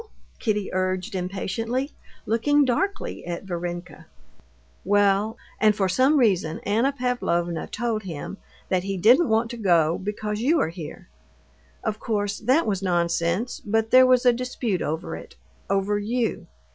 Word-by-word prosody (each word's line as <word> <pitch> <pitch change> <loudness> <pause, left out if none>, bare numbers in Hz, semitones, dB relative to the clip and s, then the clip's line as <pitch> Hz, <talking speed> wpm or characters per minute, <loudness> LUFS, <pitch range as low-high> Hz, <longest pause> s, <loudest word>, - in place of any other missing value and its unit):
Kitty 210 -4 -1
urged 185 +3 -1
impatiently, 200 +8 -2 0.3
looking 290 +6 +3
darkly 385 +11 -1
at 170 +1 -5
Varenka. 175 -1 -6 0.8
"Well, 205 +2 +2 0.2
and 215 -1 +4
for 195 -2 +1
some 260 +11 +3
reason 190 - +2
Anna 230 +7 +1
Pavlovna 175 - -1
told 230 -3 -2
him 180 0 -6 0.3
that 185 -1 +2
he 195 +1 -3
didn't 245 - +5
want 225 +1 +1
to 240 - -6
go 170 -6 +3
because 210 +2 -3
you 310 +7 +3
are - - +1
here. 165 -3 -9 0.8
Of 215 0 -2
course, 205 -2 -2
that 260 +9 +2
was 200 -3 -1
nonsense; 175 +4 0
but 220 +1 0
there 255 0 +8
was 255 0 +4
a 245 - +6
dispute 240 -6 -2
over 160 +4 -3
it—over 205 - -3
you. 230 +3 -2
210 Hz, 140 wpm, -24 LUFS, 185-245 Hz, 0.8 s, there